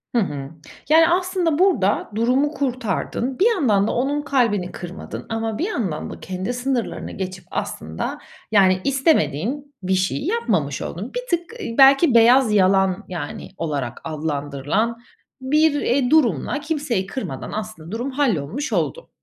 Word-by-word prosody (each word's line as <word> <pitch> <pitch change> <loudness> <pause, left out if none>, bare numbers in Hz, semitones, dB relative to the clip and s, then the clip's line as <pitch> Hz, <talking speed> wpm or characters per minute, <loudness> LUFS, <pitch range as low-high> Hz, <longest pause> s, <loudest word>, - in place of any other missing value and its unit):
Hı 235 - +4
hı. 145 -6 -4 0.4
Yani, 325 +1 +6
aslında 360 -3 +1
burada 225 - +2
durumu 255 +6 +2
kurtardın. 255 -1 -2
Bir 400 - +4
yandan 215 - +2
da - - 0
onun 280 +4 0
kalbini 230 -10 +1
kırmadın 175 +1 -8
ama 225 -1 -2
bir 345 - 0
yandan 195 - -3
da - - -8
kendi 185 +6 -4
sınırlarını 245 -1 -2
geçip 185 -1 -6
aslında, 80 +1 -4 0.3
yani, 185 -3 +4
istemediğin 275 - +1
bir 190 +1 0
şeyi 190 - 0
yapmamış 190 - 0
oldun. 195 +8 -5
Bir - - -2 0.2
tık, 345 +6 -16
ııı, 230 - -5
belki 275 +1 +7
beyaz 235 0 +6
yalan, 190 0 +3
yani, 165 -5 -6
olarak 140 -7 -3
adlandırılan 150 +7 -2 0.4
bir, 290 +2 +2
eee, 250 0 +1
durumla 285 - +2
kimseyi 290 - -2
kırmadan 195 - -5
aslında 210 -6 -6
durum 240 +5 -3
hallolmuş 260 - -1
oldu. - - -2
230 Hz, 140 wpm, -22 LUFS, 185-280 Hz, 0.4 s, belki